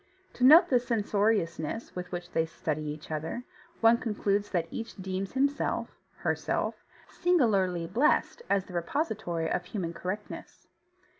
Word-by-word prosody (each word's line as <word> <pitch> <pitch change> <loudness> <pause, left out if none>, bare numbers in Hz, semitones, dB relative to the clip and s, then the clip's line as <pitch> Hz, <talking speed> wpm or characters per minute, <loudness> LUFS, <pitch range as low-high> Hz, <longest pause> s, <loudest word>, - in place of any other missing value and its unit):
To 250 - -4
note 310 +7 +9
the 250 - +5
censoriousness 210 -5 0
with 180 0 -5
which 175 0 -5
they 160 0 +1
study 155 -1 -3
each 150 +1 -7
other, 160 +10 -3 0.4
one 230 +1 +6
concludes 205 -3 0
that 170 -3 0
each 225 0 -6
deems 190 0 -4
himself 280 +2 0 0.2
(herself) - - -2 0.2
singularly 200 - +2
blessed 240 - +2
as 195 -1 +2
the 185 - -12
repository 175 - -1
of 175 - -1
human 180 -3 -4
correctness. 190 +5 -6
195 Hz, 135 wpm, -29 LUFS, 170-230 Hz, 0.4 s, note